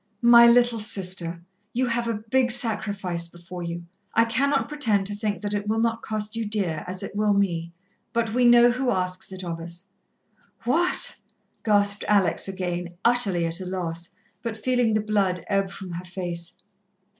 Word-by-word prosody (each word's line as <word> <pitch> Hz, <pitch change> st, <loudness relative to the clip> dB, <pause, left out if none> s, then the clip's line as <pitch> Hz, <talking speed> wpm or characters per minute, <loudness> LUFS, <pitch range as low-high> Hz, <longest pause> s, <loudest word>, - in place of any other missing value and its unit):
"My 235 Hz, 0 st, +8 dB
little 240 Hz, -1 st, +4 dB
Sister, 180 Hz, -5 st, -1 dB, 0.3 s
you 255 Hz, +2 st, +1 dB
have 235 Hz, -1 st, -1 dB
a 220 Hz, -2 st, -3 dB
big 260 Hz, -2 st, +3 dB
sacrifice 200 Hz, -7 st, +1 dB
before 175 Hz, +1 st, -10 dB
you. 170 Hz, 0 st, -5 dB, 0.3 s
I 230 Hz, -, +5 dB
cannot 275 Hz, +5 st, +1 dB
pretend 230 Hz, -10 st, +2 dB
to 205 Hz, +1 st, +1 dB
think 205 Hz, -2 st, -3 dB
that 205 Hz, 0 st, -2 dB
it 205 Hz, 0 st, -2 dB
will 220 Hz, +1 st, 0 dB
not 230 Hz, 0 st, 0 dB
cost 215 Hz, 0 st, -4 dB
you 230 Hz, -, -2 dB
dear, 195 Hz, -8 st, -2 dB
as 185 Hz, +1 st, -5 dB
it -, -, -7 dB
will 210 Hz, -1 st, +2 dB
me. 170 Hz, -4 st, 0 dB, 0.4 s
But 230 Hz, -2 st, -1 dB
we 250 Hz, +1 st, +3 dB
know 240 Hz, 0 st, +7 dB
Who 255 Hz, +1 st, -1 dB
asks 185 Hz, -3 st, -2 dB
it 190 Hz, 0 st, -7 dB
of 170 Hz, -2 st, -4 dB
us." 170 Hz, +3 st, -8 dB, 0.8 s
"What?" 330 Hz, +10 st, +1 dB, 0.5 s
gasped 205 Hz, -1 st, +2 dB
Alex 195 Hz, -5 st, +2 dB
again, 175 Hz, -2 st, -4 dB
utterly 205 Hz, -8 st, +3 dB
at 165 Hz, +2 st, -2 dB
a 185 Hz, -, -6 dB
loss, 170 Hz, -2 st, -4 dB, 0.3 s
but 230 Hz, -2 st, -4 dB
feeling 245 Hz, -1 st, +1 dB
the 215 Hz, -, +2 dB
blood 195 Hz, -5 st, 0 dB
ebb 195 Hz, -1 st, 0 dB
from 190 Hz, -2 st, -8 dB
her 175 Hz, +2 st, -6 dB
face. 175 Hz, -2 st, -5 dB
205 Hz, 175 wpm, -24 LUFS, 180-230 Hz, 0.8 s, My